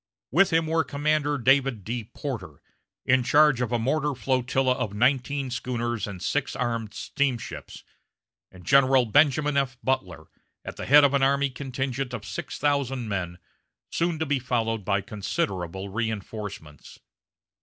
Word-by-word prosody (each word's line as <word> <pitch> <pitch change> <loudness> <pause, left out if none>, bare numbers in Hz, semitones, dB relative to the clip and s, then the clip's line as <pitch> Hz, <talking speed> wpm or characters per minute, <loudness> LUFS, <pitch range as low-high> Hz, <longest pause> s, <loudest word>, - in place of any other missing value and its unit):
With 190 +7 +4
him 165 -1 +2
were 160 +1 +1
Commander 145 +1 0
David 135 -4 +2
D. 115 +2 -4
Porter, 105 - -6 0.5
in 130 0 +4
charge 145 0 +4
of 125 -2 -1
a 120 - +2
mortar 145 +4 0
flotilla 130 +1 +1
of 115 -5 -4
nineteen 130 +3 +1
schooners 120 -3 -2
and 95 -3 -7
six - - -1
armed 115 -4 -3
steamships, 135 -5 -3 0.7
and 90 -1 -15
General 135 -2 +5
Benjamin 145 +4 +3
F. 135 -2 0
Butler, 95 -11 -2 0.4
at - - -6
the - - -6
head 145 +2 +8
of 140 -1 +4
an 140 - +2
army 140 0 +2
contingent 130 -1 -3
of 110 -2 -8
six 95 -1 -6
thousand 135 -5 0
men, 90 -3 -3 0.5
soon 170 -1 0
to 160 - -1
be 145 -2 0
followed 115 -4 -1
by 100 0 +1
considerable 95 -2 -3
reinforcements. 105 - -6
125 Hz, 145 wpm, -26 LUFS, 110-140 Hz, 0.7 s, head